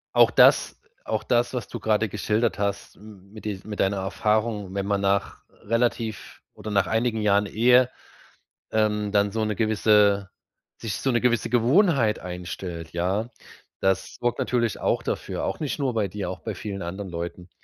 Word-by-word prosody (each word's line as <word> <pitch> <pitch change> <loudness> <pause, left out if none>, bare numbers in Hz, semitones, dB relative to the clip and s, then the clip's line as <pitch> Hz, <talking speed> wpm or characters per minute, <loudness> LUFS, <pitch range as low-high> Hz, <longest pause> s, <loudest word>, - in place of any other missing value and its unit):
Auch - - +7
das - - +4 0.3
auch - - -2
das, 120 0 +1
was 125 -4 -3
du - - -7
grade 110 0 +1
geschildert 110 +2 -1
hast 100 -1 -3
mit 105 0 -14
dies 100 -3 -4
mit 105 -1 -7
deiner 95 +1 +1
Erfahrung, 105 +1 -1
wenn 100 0 -1
man 100 0 0
nach 100 0 0
relativ 115 -1 -2
oder 110 - -8
nach 100 -2 +2
einigen 110 0 0
Jahren 105 0 +3
Ehe, 125 +4 +4 0.8
ähm, 105 -1 +1
dann 100 0 +2
so 110 +1 -1
'ne 105 -1 -1
gewisse 105 -2 +3 0.5
sich 110 -4 -3
so 135 - 0
'ne 120 - +1
gewisse 120 -3 +1
Gewohnheit 125 - +3
einstellt, 90 -2 -6
ja? 95 +7 -1 0.5
Das 95 0 0
sorgt 120 -1 0
natürlich 120 -4 0
auch - - +1
dafür- - - -3
auch - - -2
nicht 150 -1 -3
nur 135 -3 0
bei 105 -3 +1
dir, 100 +2 -5
auch 95 - -6
bei 110 - -4
vielen 100 0 -6
anderen 95 +3 -5
Leuten- 85 +1 -6
105 Hz, 170 wpm, -25 LUFS, 100-115 Hz, 0.8 s, Auch